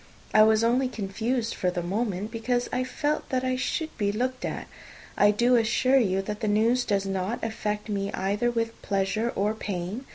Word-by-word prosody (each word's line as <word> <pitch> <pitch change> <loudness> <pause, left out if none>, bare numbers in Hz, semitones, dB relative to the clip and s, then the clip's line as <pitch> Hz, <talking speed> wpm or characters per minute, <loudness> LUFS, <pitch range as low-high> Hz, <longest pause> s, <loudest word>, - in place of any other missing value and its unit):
I 215 - +7
was 220 +1 +5
only 250 +3 +3
confused 225 +2 -2
for 180 - 0
the 180 -1 -3
moment, 205 +2 -2
because 245 +2 -1
I 250 0 +1
felt 295 +4 -2
that 255 -2 0
I 255 0 0
should 315 +5 -2
be 200 -1 +1
looked 255 +4 -2
at. - - -4 0.5
I 205 - +5
do 235 +4 +3
assure 240 +3 +3
you 195 -4 +1
that 210 +1 -4
the 220 - -2
news 225 +4 +2
does 200 -2 0
not 195 +4 -2
affect 210 -1 -3
me 200 -2 -2
either 205 +5 0
with 230 -1 -2
pleasure 205 +4 0
or 205 +2 +1
pain. 205 +3 -4
220 Hz, 190 wpm, -27 LUFS, 200-245 Hz, 0.5 s, I